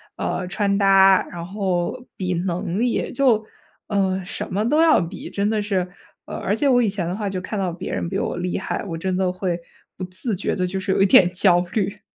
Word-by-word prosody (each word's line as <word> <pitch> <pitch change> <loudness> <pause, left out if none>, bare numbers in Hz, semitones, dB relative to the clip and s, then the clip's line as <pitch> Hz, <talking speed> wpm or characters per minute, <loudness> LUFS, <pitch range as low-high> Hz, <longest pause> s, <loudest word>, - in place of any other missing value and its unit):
呃， 180 - -3
穿 200 +1 0
搭， 195 -1 +6
然 170 -1 -7
后 190 +4 -2
比 185 -1 -2
能 180 +2 -2
力， 240 0 0
就， 240 -5 +2 0.4
嗯， 190 -2 0
什 190 - -6
么 210 +4 0
都 305 +5 +3
要 320 - +5
比， 170 +4 -6
真 200 +1 -1
的 215 -1 0
是 185 -3 -1 0.3
呃， - - -7
而 205 - -1
且 280 +5 +1
我 245 -1 +5
以 225 - +2
前 195 -3 -3
的 180 - -2
话， 205 -2 -3
就 185 -1 -4
看 205 +2 -4
到 185 -2 -1
别 185 +2 -6
人 - - -2
比 195 - -2
我 175 - -2
厉 180 0 -2
害， 190 - -3
我 165 -3 -4
真 185 +2 -2
的 185 -1 +1
会 180 -2 -2 0.4
不 185 - -5
自 185 +5 -4
觉 190 - -2
地 185 -1 0
就 190 +1 -3
是 190 - -2
有 - - +1
一 - - +6
点 185 -1 +6
焦 180 -1 +4
虑。 200 -2 -1
190 Hz, 245 characters per minute, -22 LUFS, 180-205 Hz, 0.4 s, 搭